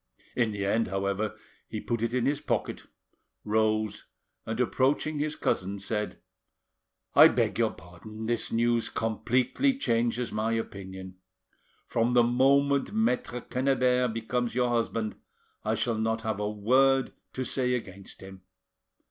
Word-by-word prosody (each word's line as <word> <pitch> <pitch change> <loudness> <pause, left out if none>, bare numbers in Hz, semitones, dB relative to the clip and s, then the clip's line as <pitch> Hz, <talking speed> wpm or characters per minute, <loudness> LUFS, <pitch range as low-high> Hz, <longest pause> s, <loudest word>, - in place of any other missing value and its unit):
In 120 -3 +2
the 100 -2 -3
end, 110 +3 +1
however, 100 +2 -2 0.3
he - - -5
put 115 -2 -2
it 115 0 0
in 125 -1 0
his 145 +1 0
pocket, - - -2 0.6
rose, 110 0 0 0.4
and 110 +1 -3
approaching 140 +4 +1
his 150 +1 -1
cousin, 95 +2 -1
said— 105 +1 -3 1.0
"I - - +9
beg - - 0
your - - +3
pardon, 90 +6 -10
this 120 +1 -1
news 115 0 +1
completely 125 - 0
changes 120 - 0
my 110 +2 -1
opinion. 95 -4 -6 0.7
From 115 +2 0
the 120 - +6
moment 140 +3 +3
Maitre 125 - 0
Quennebert 125 -1 +1
becomes 115 +2 -2
your 125 -1 +2
husband 115 -2 -1 0.5
I - - 0
shall 115 -3 -1
not 110 0 -1
have 110 -2 -2
a 105 0 -1
word 130 +6 +3 0.2
to 130 - -2
say 125 0 0
against 100 -5 -8
him. 95 0 -11
115 Hz, 140 wpm, -28 LUFS, 105-125 Hz, 1.0 s, I